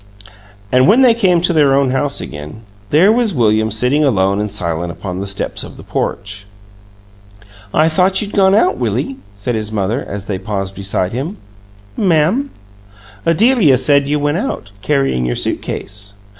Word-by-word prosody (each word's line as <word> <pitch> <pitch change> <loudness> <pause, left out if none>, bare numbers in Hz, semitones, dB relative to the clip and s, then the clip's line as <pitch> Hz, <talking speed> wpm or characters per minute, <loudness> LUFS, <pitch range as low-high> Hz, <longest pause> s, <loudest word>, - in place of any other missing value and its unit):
And 130 0 +4
when 235 +7 +5
they 245 -3 +6
came 185 -7 +2
to 175 0 +1
their 145 -4 +4
own 135 -2 +2
house 140 +2 -1
again, 75 +8 -8 0.3
there 175 +8 +5
was 225 -5 +1
William 110 -2 +2
sitting 125 +8 +1
alone 100 -6 +2
and 105 - -2
silent 85 -4 -2
upon 90 +1 -6
the 100 - -4
steps 100 - -2
of - - -11
the - - -11
porch. 100 0 -4 1.2
"I 155 +7 +3
thought 185 +4 +2
you'd 205 -1 -4
gone 195 0 +4
out, 360 - +3
Willie," 270 -1 -2 0.2
said 105 +5 -3
his 110 -1 -3
mother, 110 +5 -1
as 100 -1 -6
they 100 -2 -3
paused 95 -1 -4
beside 95 -1 -2
him. 150 - -4 0.6
"Ma'am?" 185 - +2 0.8
"Adelia 185 - +4
said 140 +1 +3
you 150 - +1
went 145 +2 0
out, 185 - -4
carrying 135 - 0
your 60 0 -1
suit - - -2
case." 100 0 -6
130 Hz, 170 wpm, -16 LUFS, -, 1.2 s, they